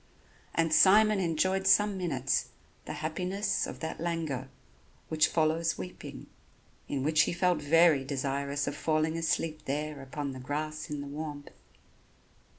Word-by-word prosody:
And 165 -1 +2
Simon 210 +4 +6
enjoyed 185 +3 +1
some 205 +1 +5
minutes 140 -8 -1 0.4
the - - -5
happiness 190 +5 -1
of - - -8
that 160 - -4
languor 160 -6 -3 0.6
which 155 0 +3
follows 160 +1 +1
weeping, 90 -1 -8 0.6
in 135 -2 -2
which 155 +2 +4
he - - -2
felt 175 -2 +1
very 160 -1 +5
desirous 140 +1 -2
of 145 - -3
falling 155 +1 0
asleep 160 -1 -1
there 150 +1 -3
upon 140 +1 -5
the 130 - -8
grass 155 +4 -4
in 150 -1 -4
the 140 - -7
warmth. 145 0 -6
155 Hz, 140 wpm, -30 LUFS, 145-170 Hz, 0.6 s, Simon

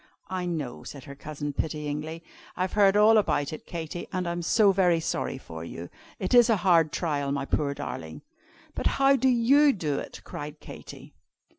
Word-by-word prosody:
"I 185 -1 -2
know," 155 -7 -4
said 140 -3 -9
her 140 - -9
cousin, 145 0 -6
pityingly. 150 +2 -4 0.3
"I've 185 +1 -1
heard 200 -1 +4
all 215 +1 +6
about 145 -8 0
it, 155 - -9
Katy, 170 0 -6
and 185 -2 -2
I'm 170 0 -2
so 200 +4 +4
very 180 -3 +3
sorry 160 - -2
for 80 -10 -9
you! 85 +1 -8 0.3
It 185 - -3
is 240 -1 +7
a 225 - +4
hard 165 -4 +4
trial, 145 -5 -1
my 140 -1 -2
poor 140 0 -1
darling." 80 - -7 0.5
"But - - -2
how 275 0 +5
do 260 0 +2
you 270 +5 +5
do 150 - -2
it?" - - -8
cried 150 +1 -7
Katy. - - -11
165 Hz, 180 wpm, -27 LUFS, 145-200 Hz, 0.5 s, is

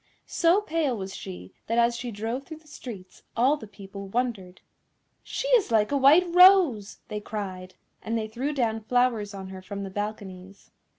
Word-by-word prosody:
So 345 +4 +2
pale 310 - -1
was 190 -1 -6
she 90 0 -9
that 230 - -1
as 235 0 +3
she 245 +1 -5
drove 230 +5 -4
through 315 - -8
the 315 0 -22
streets 215 -10 -10 0.2
all 260 +5 +4
the 255 -8 -10
people 200 -1 -10
wondered. 200 -5 -3 0.6
"She - - -4
is 485 - +4
like 220 0 +2
a - - +1
white 285 +6 +6
rose!" 360 - +6
they 210 - -4
cried, 190 -3 -6 0.3
and 225 +1 -2
they 220 -1 -2
threw 250 +7 -3
down 230 -6 0
flowers 225 -3 0
on 190 -1 -8
her 190 0 -9
from 200 +1 -6
the 195 - -6
balconies. 195 -2 -7
220 Hz, 180 wpm, -26 LUFS, 195-270 Hz, 0.6 s, white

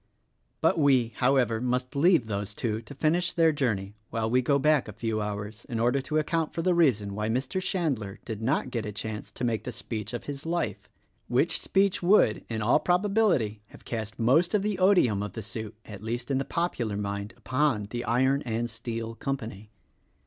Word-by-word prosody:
But - - +3
we, 130 -6 +4
however, 125 -3 +2
must 125 +1 -1
leave 160 -3 +4
those 105 -1 -4
two 110 -2 -2
to 140 +5 -11
finish 170 +5 +1
their 165 -1 +4
journey 110 -9 -1 0.2
while 115 -1 -1
we 125 +3 +3
go 140 +3 +2
back 150 -2 +3
a 105 - -7
few 110 0 -2
hours 105 +1 -5
in 115 -3 -2
order 125 +4 +2
to 155 +3 -2
account 160 +1 0
for 165 - -1
the 185 - +3
reason 120 -12 +2
why 105 +2 -2
Mr. 130 +10 -1
Chandler 140 - -2
did 110 -2 -5
not 130 +2 0
get 115 -3 -2
a - - -3
chance 105 +1 -6
to - - -6
make 115 -3 0
the 125 - -4
speech 110 -2 -5
of 120 - -5
his 145 0 -6
life, 170 +1 -2 0.4
which - - +1
speech 195 -1 +2
would, 175 - +4
in 110 -2 -2
all 120 +7 +4
probability, 180 - +2
have - - -16
cast 110 -2 -4
most 150 - +3
of 200 - +2
the 205 -3 -1
odium 180 - +4
of 105 -2 -4
the 110 - -6
suit, 110 0 -6
at 100 -2 -9
least 120 +4 -3
in 135 - +2
the 135 - -2
popular 120 -12 -1
mind, 100 +1 -4
upon 130 -3 +1
the 120 0 -3
Iron 130 +5 +2
and 120 -1 -2
Steel 115 0 -5
Com 135 +4 -2
pany. 110 -3 -9
120 Hz, 200 wpm, -28 LUFS, 110-150 Hz, 0.4 s, we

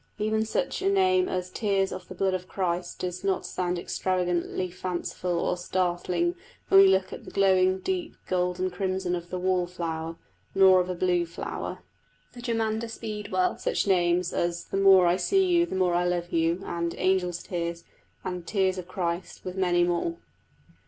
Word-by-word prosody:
Even 220 +1 0
such - - -1
a 390 - +2
name 370 -1 +3
as 180 0 -3
Tears 195 -3 0
of - - -7
the 185 - -9
blood 190 +1 +1
of 185 0 -3
Christ 175 -2 -2
does 180 0 -4
not 195 -1 0
sound 180 -1 -2
extravagantly 180 0 -1
fanciful 180 0 -3
or 180 - 0
startling 180 - 0 0.4
when 195 - +8
we 195 - +8
look 190 0 +2
at - - -8
the - - -10
glowing 190 -1 +3
deep 355 - -3
golden 180 0 0
crimson 185 0 -2
of 175 0 -7
the 185 - -3
wall 180 -1 +1
flower; 165 -2 -4 0.4
nor 190 -1 +7
of 180 0 -1
a 180 - -2
blue 175 -1 +1
flower, 170 - -6 0.5
the 245 - -10
germander 225 -1 -1
speedwell, 210 -5 -2
such - - 0
names 180 -2 +2
as 170 0 -1
The - - -3
more 195 -2 +7
I 175 +1 +3
see 385 - +2
you 345 -1 +3
the - - -4
more 185 -2 +2
I 175 +1 +2
love 175 0 -1
you, 165 +3 +1
and 170 0 -2
Angels' 180 -2 +1
tears, 170 -1 -4 0.4
and 180 -2 -5
Tears 190 -2 +1
of 180 - -8
Christ, 175 -1 -4
with 185 0 -5
many 175 -2 +2
more. 175 - 0
185 Hz, 180 wpm, -27 LUFS, 175-195 Hz, 0.5 s, when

